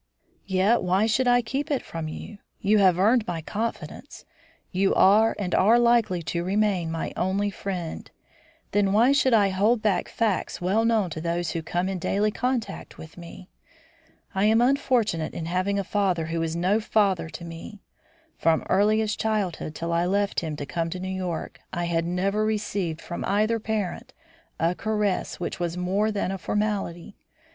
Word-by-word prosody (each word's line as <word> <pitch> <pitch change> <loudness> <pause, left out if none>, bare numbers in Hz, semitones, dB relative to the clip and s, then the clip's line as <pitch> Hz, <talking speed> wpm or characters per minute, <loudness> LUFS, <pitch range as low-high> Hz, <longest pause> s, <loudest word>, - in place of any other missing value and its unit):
"Yet 195 +5 +3
why 185 +4 +2
should 235 +3 +1
I 245 0 +4
keep 275 +7 -3
it 280 -4 0
from 165 -1 -5
you? 200 +6 -8 0.2
You 210 +1 +3
have 185 -3 +5
earned 220 +4 +3
my 170 -2 -2
confidence. 220 +8 -5 0.5
You 195 +1 +2
are, 215 +4 +5
and 185 -4 -3
are 220 +5 +5
likely 235 -7 +3
to 170 +4 -2
remain, 195 -3 +1
my 165 0 -3
only 200 +3 0
friend; 180 -4 -5 0.6
then 200 -1 +2
why 235 +5 +5
should 265 -3 +4
I 205 -2 +4
hold 210 +4 +2
back 200 -5 +1
facts 220 -5 -1
well 195 +6 +1
known 220 -6 +2
to 160 - -5
those 170 0 -1
who 165 - -3
come 175 +3 -2
in 190 -1 -3
daily 205 +5 +1
contact 240 -3 -3
with 160 - -11
me? 175 +1 -11 0.9
I 190 +2 +1
am 220 +1 +4
unfortunate 245 - +1
in 165 - -4
having 185 +4 0
a 200 - 0
father 185 -4 0
who 165 +1 -2
is 165 0 -2
no 185 +5 +2
father 200 -6 +1
to 170 - -8
me. 170 +5 -9 0.6
From 165 -1 +2
earliest 215 +2 +2
childhood 195 -8 -2
till 170 0 -3
I 170 +1 +1
left 200 +1 +1
him 160 -3 -4
to 145 - -5
come 165 +3 -2
to 180 +2 -5
New 185 +1 -4
York, 180 -3 -4
I 175 -1 -2
had 170 -1 0
never 195 +4 0
received 205 -6 -2
from 175 - -6
either 215 +3 +1
parent 215 -4 -3 0.5
a 165 +2 +2
caress 210 -1 -1
which 175 - -4
was 175 0 -2
more 195 +4 0
than 200 -2 -1
a 195 - -4
formality. 200 -3 -2
195 Hz, 175 wpm, -25 LUFS, 175-215 Hz, 0.9 s, have